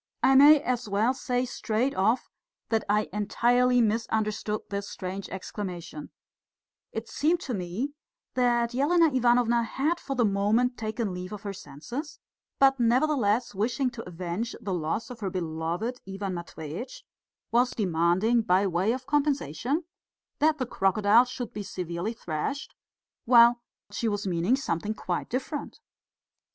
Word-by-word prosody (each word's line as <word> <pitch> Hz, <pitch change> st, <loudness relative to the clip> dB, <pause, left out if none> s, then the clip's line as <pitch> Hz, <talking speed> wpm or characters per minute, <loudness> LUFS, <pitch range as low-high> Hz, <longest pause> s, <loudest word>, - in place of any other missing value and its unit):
I 265 Hz, -, +6 dB
may 290 Hz, +3 st, +8 dB
as 250 Hz, -5 st, -2 dB
well 215 Hz, +5 st, +2 dB
say 250 Hz, -1 st, -1 dB
straight 245 Hz, +2 st, -1 dB
off 215 Hz, +6 st, +1 dB, 0.4 s
that 225 Hz, -2 st, +1 dB
I 210 Hz, +1 st, +2 dB
entirely 245 Hz, +4 st, +3 dB
misunderstood 215 Hz, -1 st, 0 dB
this 200 Hz, 0 st, -3 dB
strange 190 Hz, +1 st, -6 dB
exclamation: 180 Hz, -5 st, -6 dB, 0.8 s
it 225 Hz, +1 st, -5 dB
seemed 325 Hz, +8 st, +1 dB
to 255 Hz, -, -4 dB
me 200 Hz, +9 st, -3 dB, 0.4 s
that 240 Hz, -1 st, +2 dB
Elena 315 Hz, +4 st, +3 dB
Ivanovna 240 Hz, -1 st, +3 dB
had 285 Hz, +9 st, -1 dB
for 275 Hz, -, -4 dB
the 245 Hz, -2 st, +3 dB
moment 210 Hz, +5 st, +2 dB
taken 220 Hz, -2 st, -3 dB
leave 180 Hz, +1 st, -6 dB
of 210 Hz, 0 st, -7 dB
her 200 Hz, -1 st, -4 dB
senses, 205 Hz, -, -7 dB, 0.4 s
but 270 Hz, -1 st, +4 dB
nevertheless 240 Hz, -2 st, +2 dB
wishing 245 Hz, +6 st, 0 dB
to 230 Hz, -4 st, -8 dB
avenge 180 Hz, +6 st, -4 dB
the 195 Hz, -, -4 dB
loss 175 Hz, +8 st, -2 dB
of 240 Hz, -, -9 dB
her 200 Hz, -3 st, -2 dB
beloved 175 Hz, +7 st, -3 dB
Ivan 195 Hz, -1 st, -4 dB
Matveitch, 170 Hz, -, -7 dB, 0.5 s
was 245 Hz, +2 st, +4 dB
demanding 185 Hz, +4 st, +2 dB
by 190 Hz, -2 st, +2 dB
way 190 Hz, +4 st, +1 dB
of 255 Hz, 0 st, -6 dB
compensation 280 Hz, -, 0 dB, 0.6 s
that 310 Hz, +1 st, +3 dB
the 255 Hz, -, -1 dB
crocodile 210 Hz, +2 st, +3 dB
should 245 Hz, -1 st, -6 dB
be 210 Hz, -, -4 dB
severely 180 Hz, +2 st, -4 dB
thrashed, 225 Hz, -, -4 dB, 0.5 s
while 235 Hz, 0 st, +6 dB, 0.3 s
she 230 Hz, -, -2 dB
was 205 Hz, -1 st, -1 dB
meaning 180 Hz, +6 st, +2 dB
something 210 Hz, -4 st, -2 dB
quite 180 Hz, -4 st, -3 dB
different. 275 Hz, +4 st, -4 dB
225 Hz, 140 wpm, -27 LUFS, 190-250 Hz, 0.8 s, may